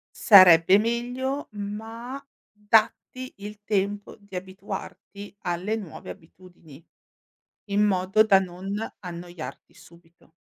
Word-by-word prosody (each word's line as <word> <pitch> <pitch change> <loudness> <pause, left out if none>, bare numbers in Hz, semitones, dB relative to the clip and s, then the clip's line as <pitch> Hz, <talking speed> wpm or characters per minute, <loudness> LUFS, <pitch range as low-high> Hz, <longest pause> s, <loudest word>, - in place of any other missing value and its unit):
Sarebbe 185 -3 +7
meglio, 245 +5 -3
ma 225 +6 -7 0.3
datti 220 +4 0
il 205 +1 -10
tempo 205 0 -2
di 200 -2 -14
abituarti 195 +2 -8
alle 180 +5 -2
nuove 200 -8 -9
abitudini, 170 -3 -14 0.9
in 205 +1 +2
modo 195 0 +3
da 200 -3 +5
non 185 0 -6 0.3
annoiarti 175 -2 -9
subito. 170 -1 -21
200 Hz, 100 wpm, -25 LUFS, 180-215 Hz, 0.9 s, Sarebbe